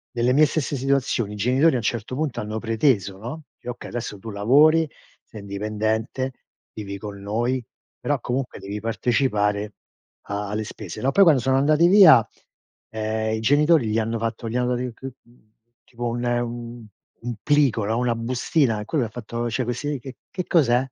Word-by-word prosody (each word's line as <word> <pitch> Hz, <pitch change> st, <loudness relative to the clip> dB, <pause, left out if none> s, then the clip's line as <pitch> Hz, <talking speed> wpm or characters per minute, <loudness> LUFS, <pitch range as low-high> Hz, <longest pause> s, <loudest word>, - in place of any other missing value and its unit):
Nelle 120 Hz, +1 st, +2 dB
mie 150 Hz, +3 st, +6 dB
stesse 150 Hz, -1 st, -2 dB
situazioni, 130 Hz, -5 st, 0 dB
i -, -, -6 dB
genitori, 130 Hz, +10 st, +3 dB
a -, -, +1 dB
un -, -, -2 dB
certo 115 Hz, +1 st, -2 dB
punto, 140 Hz, -3 st, -2 dB
hanno 110 Hz, 0 st, -4 dB
preteso, 110 Hz, -, +1 dB
no: 130 Hz, +9 st, -7 dB, 0.2 s
“Okay, 120 Hz, 0 st, -7 dB
adesso 115 Hz, -4 st, -5 dB
tu 110 Hz, -, -8 dB
lavori, 145 Hz, +10 st, +4 dB, 0.4 s
sei 110 Hz, -, -11 dB
indipendente, 110 Hz, +5 st, -2 dB, 0.4 s
vivi 100 Hz, -2 st, -6 dB
con 100 Hz, -1 st, -7 dB
noi, 120 Hz, +5 st, -1 dB, 0.3 s
però, -, -, -1 dB
comunque, 125 Hz, +1 st, -3 dB
devi 100 Hz, +2 st, -6 dB
partecipare 105 Hz, -3 st, 0 dB, 0.5 s
a 100 Hz, 0 st, -3 dB
alle 105 Hz, +1 st, -2 dB
spese, -, -, -8 dB
no?” 130 Hz, -, +1 dB
Poi, 200 Hz, -, +6 dB
quando 155 Hz, -8 st, +5 dB
sono 130 Hz, +2 st, +2 dB
andati 155 Hz, +4 st, +4 dB
via, 175 Hz, -, +8 dB, 0.7 s
ehm, 110 Hz, 0 st, -2 dB
i -, -, -3 dB
genitori 145 Hz, +2 st, +3 dB
gli 110 Hz, +1 st, 0 dB
hanno 115 Hz, +1 st, -1 dB
fatto 115 Hz, 0 st, -3 dB
gli 115 Hz, -, -5 dB
hanno 125 Hz, 0 st, +1 dB
rinc 125 Hz, -1 st, -5 dB
mhmm, 125 Hz, -4 st, -12 dB, 0.3 s
tipo 120 Hz, 0 st, -6 dB
un 120 Hz, +1 st, -3 dB, 1.0 s
un 120 Hz, 0 st, -4 dB
plico, 140 Hz, -8 st, +2 dB
no, 110 Hz, +3 st, 0 dB
una 120 Hz, -1 st, +1 dB
bustina. 120 Hz, 0 st, 0 dB
E -, -, -7 dB
Quello 135 Hz, +1 st, 0 dB
ha 110 Hz, -, -6 dB
fatto: 120 Hz, +1 st, -4 dB
“Cioè, 120 Hz, +2 st, -1 dB
questi 135 Hz, +5 st, -2 dB
che 130 Hz, +1 st, -10 dB
che 180 Hz, -2 st, -4 dB
cos'è?” 130 Hz, -8 st, +3 dB
120 Hz, 175 wpm, -23 LUFS, 110-135 Hz, 1.0 s, via